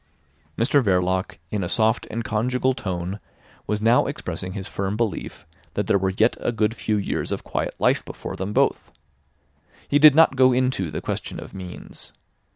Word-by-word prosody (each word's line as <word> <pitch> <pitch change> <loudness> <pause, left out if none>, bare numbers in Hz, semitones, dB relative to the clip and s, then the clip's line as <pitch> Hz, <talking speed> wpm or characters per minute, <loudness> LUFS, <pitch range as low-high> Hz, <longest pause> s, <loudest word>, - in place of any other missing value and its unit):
Mr 140 +5 +3
Verloc, 90 -2 +1
in 105 -3 -1
a 85 - -3
soft 110 0 +1
and 115 +1 -3
conjugal 125 +4 0
tone, 95 -2 -4 0.5
was 105 0 -1
now 115 +2 +4
expressing 90 0 -5
his 95 -2 -5
firm 100 +1 -3
belief 115 -3 -3 0.3
that 105 - 0
there 100 - +3
were 95 0 +1
yet 110 +5 +2
a - - -1
good 110 -1 0
few 110 -2 -1
years 100 - -2
of - - -3
quiet - - -3
life - - +2
before - - -7
them 95 +2 -4
both. - - +1 1.0
He 145 - +3
did 150 -1 +8
not 160 -4 +6
go 130 -1 +5
into 125 -8 0
the - - -4
question - - -4
of - - -10
means. 90 -2 -9
105 Hz, 175 wpm, -23 LUFS, 95-120 Hz, 1.0 s, did